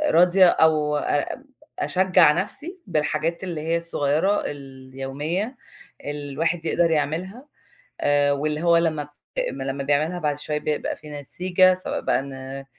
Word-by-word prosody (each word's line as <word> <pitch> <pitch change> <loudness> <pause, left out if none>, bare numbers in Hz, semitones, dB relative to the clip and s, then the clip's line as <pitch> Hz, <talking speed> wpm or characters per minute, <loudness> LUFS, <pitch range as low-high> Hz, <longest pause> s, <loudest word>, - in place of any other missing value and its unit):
راضية 180 +2 +6
أو 155 -3 +3
أب 145 - -2 0.3
أشجّع 185 -3 +4
نَفْسي 295 - -3
بالحاجات 160 +1 -1
اللي 170 -5 -4
هي 165 +2 0
الصغيّرة 170 +3 +1
اليوميّة 135 - -5 0.5
اللي 145 -1 -5
الواحد 165 +3 -1
يقدر 170 +1 +2
يعملها 180 - -2 0.5
آآ، 145 0 +3
واللي 150 +2 -1
هو 170 -1 +5
لمّا 155 -3 0 0.4
لمّا 135 +1 -4
بيعملها 155 +5 +1
بعد 150 -3 -1
شويّة 150 0 -2
بيبقى 150 0 -2
في 150 -1 -12
نتيجة 185 +5 +3
سواء 185 0 -3
بقى - - +1
إن 135 0 -7
155 Hz, 130 wpm, -23 LUFS, 145-175 Hz, 0.5 s, راضية